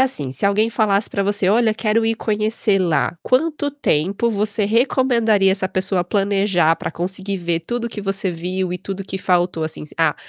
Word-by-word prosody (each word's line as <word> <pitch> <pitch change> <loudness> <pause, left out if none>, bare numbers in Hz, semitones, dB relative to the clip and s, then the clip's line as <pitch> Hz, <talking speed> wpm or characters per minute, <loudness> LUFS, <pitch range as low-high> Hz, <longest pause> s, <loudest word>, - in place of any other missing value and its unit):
assim, 155 - 0
se 135 - -4
alguém 210 +3 +3
falasse 210 -2 +1
pra 200 - -1
você: 205 -1 +1
"Olha, 220 +2 +3
quero 220 +1 0
ir 225 0 0
conhecer 215 -1 0
lá". 175 -1 0
Quanto 290 +2 0
tempo 200 - 0
você 210 0 0
recomendaria 230 -3 +2
essa 190 -1 -2
pessoa 190 -1 0
planejar 195 -3 +2
pra - - -5
conseguir 190 +3 -4
ver 170 -2 -1
tudo 235 +8 -4
o 235 - -2
que 215 - -6
você 195 -1 -1
viu 180 +2 -3
e 180 - -3
tudo 195 +1 -6
o - - -5
que 190 - -4
faltou, 180 -3 0
assim, 155 0 -4
s 150 - -12
"Ah, - - +2
200 Hz, 200 wpm, -20 LUFS, 185-220 Hz, -, alguém